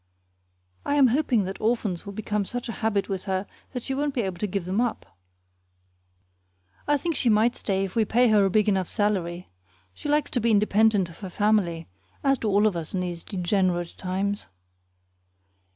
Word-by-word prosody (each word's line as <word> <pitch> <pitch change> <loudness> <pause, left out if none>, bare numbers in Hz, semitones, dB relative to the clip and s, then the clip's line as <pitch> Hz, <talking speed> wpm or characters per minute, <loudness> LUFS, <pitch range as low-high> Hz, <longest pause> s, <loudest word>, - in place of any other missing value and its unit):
I 285 - 0
am 275 -3 +6
hoping 250 -4 +2
that 190 +1 -6
orphans 215 -5 -1
will 200 - -6
become 210 0 -2
such 245 +5 -5
a - - -3
habit 205 -3 +1
with 190 -1 -4
her 190 0 -1 0.3
that 250 -3 -5
she 270 - -3
won't 285 +1 -1
be 245 - +1
able 190 -3 -4
to 210 - -1
give 195 -2 -3
them 190 +5 0
up. 240 -3 -2 1.8
I 290 0 +3
think 330 +3 -2
she 250 - +1
might 220 +3 +3
stay 195 -1 -1
if 190 - -8
we 225 - +4
pay 240 +3 +3
her 210 -2 +5
a 195 - +3
big 210 +2 +2
enough 190 -3 +1
salary. 185 -5 -1 0.4
She 295 - -6
likes 300 0 +1
to 245 - 0
be 235 - +2
independent 210 -2 +3
of 165 - -16
her 190 - -6
family, 180 -5 +1 0.4
as 275 -2 +3
do 225 - -2
all 205 +1 +3
of 210 -4 +2
us 165 +2 -4
in 185 - 0
these 175 -2 -4
degenerate 180 -2 0
times. 195 +2 -2
205 Hz, 195 wpm, -25 LUFS, 190-230 Hz, 1.8 s, am